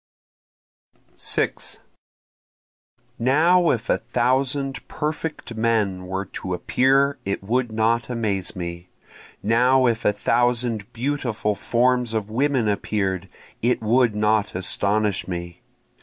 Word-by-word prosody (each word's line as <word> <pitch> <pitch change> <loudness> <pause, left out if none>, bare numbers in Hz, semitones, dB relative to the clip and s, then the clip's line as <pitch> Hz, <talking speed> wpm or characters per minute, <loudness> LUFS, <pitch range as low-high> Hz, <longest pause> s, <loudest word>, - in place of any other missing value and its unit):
6 - - -2 1.4
Now 165 +8 +4
if 115 -2 0
a - - +2
thousand 130 +3 0
perfect 150 -4 -4
men 110 -5 0
were 95 +1 -3
to 90 -1 -5
appear 135 +7 +2
it 100 0 -3
would 120 +3 0
not 115 +2 +1
amaze 105 -6 -2
me, 85 0 -6 0.5
Now 125 +5 +4
if 115 -1 +1
a - - +4
thousand 120 -1 0
beautiful 120 -4 -1
forms 125 +1 +1
of 110 -1 -2
women 130 -1 +1
appear'd 100 -3 -1 0.3
it 120 -1 +1
would 115 0 +3
not 105 -1 +1
astonish 100 +2 0
me. 85 -1 -6
115 Hz, 110 wpm, -23 LUFS, 100-125 Hz, 1.4 s, Now